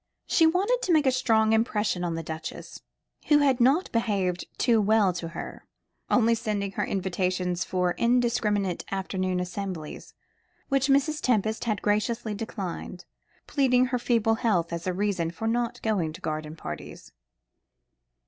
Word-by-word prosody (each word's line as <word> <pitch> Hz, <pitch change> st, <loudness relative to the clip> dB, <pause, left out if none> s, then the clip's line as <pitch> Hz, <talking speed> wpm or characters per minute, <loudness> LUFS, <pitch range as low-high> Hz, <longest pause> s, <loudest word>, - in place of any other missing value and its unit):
She 325 Hz, -, +4 dB
wanted 400 Hz, +9 st, +1 dB
to 365 Hz, -, 0 dB
make 310 Hz, -3 st, +4 dB
a 265 Hz, -, +4 dB
strong 225 Hz, -3 st, +2 dB
impression 210 Hz, -5 st, +1 dB
on 170 Hz, -2 st, -1 dB
the 165 Hz, -, -4 dB
Duchess, 160 Hz, 0 st, -7 dB, 0.5 s
who 295 Hz, -, +6 dB
had 270 Hz, -4 st, +3 dB
not 275 Hz, +9 st, +3 dB
behaved 195 Hz, -6 st, 0 dB
too 230 Hz, -3 st, +3 dB
well 205 Hz, -2 st, +3 dB
to 175 Hz, -1 st, -5 dB
her, 165 Hz, -, -8 dB, 0.4 s
only 230 Hz, -1 st, +4 dB
sending 210 Hz, -4 st, -2 dB
her -, -, -2 dB
invitations 180 Hz, -1 st, -1 dB
for 180 Hz, -1 st, 0 dB
indiscriminate 230 Hz, -6 st, +1 dB
afternoon 185 Hz, -1 st, -1 dB
assemblies, 180 Hz, -3 st, -6 dB, 0.5 s
which 275 Hz, -1 st, +2 dB
Mrs. 290 Hz, +2 st, +2 dB
Tempest 220 Hz, -2 st, 0 dB
had 215 Hz, -4 st, -1 dB
graciously 215 Hz, +1 st, 0 dB
declined, 195 Hz, -4 st, -6 dB, 0.4 s
pleading 255 Hz, -3 st, +3 dB
her 250 Hz, -, +2 dB
feeble 230 Hz, -2 st, +2 dB
health 175 Hz, -7 st, +1 dB
as 170 Hz, +2 st, -4 dB
a -, -, +2 dB
reason 185 Hz, -3 st, -1 dB
for 175 Hz, +7 st, -5 dB
not 235 Hz, +1 st, -1 dB
going 185 Hz, -8 st, 0 dB
to -, -, -11 dB
garden 155 Hz, 0 st, -4 dB
parties. 75 Hz, -, -8 dB
210 Hz, 150 wpm, -26 LUFS, 180-240 Hz, 0.5 s, who